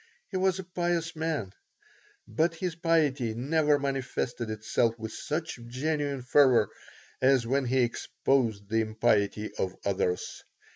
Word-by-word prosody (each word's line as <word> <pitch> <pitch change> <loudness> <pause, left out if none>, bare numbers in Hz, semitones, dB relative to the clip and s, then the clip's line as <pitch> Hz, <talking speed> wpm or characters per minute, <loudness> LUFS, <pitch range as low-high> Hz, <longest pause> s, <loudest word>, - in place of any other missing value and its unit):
He 190 - -1
was 190 0 +2
a 190 - -5
pious 175 -2 -1
man, 155 -12 -2 0.7
but 160 +10 +1
his 180 0 -2
piety 150 -8 +1
never 150 +4 +2
manifested 135 -4 -2
itself 110 +2 0
with 110 -1 -6
such 160 -3 -4
genuine 140 +1 -2
fervor 125 -5 +5 0.5
as 130 -2 +4
when 135 +3 +1
he 130 +1 +2
exposed 115 -3 0
the 110 +2 +1
impiety 110 -1 +1
of 95 -1 -1
others. 95 -2 -1
130 Hz, 130 wpm, -28 LUFS, 110-160 Hz, 0.7 s, fervor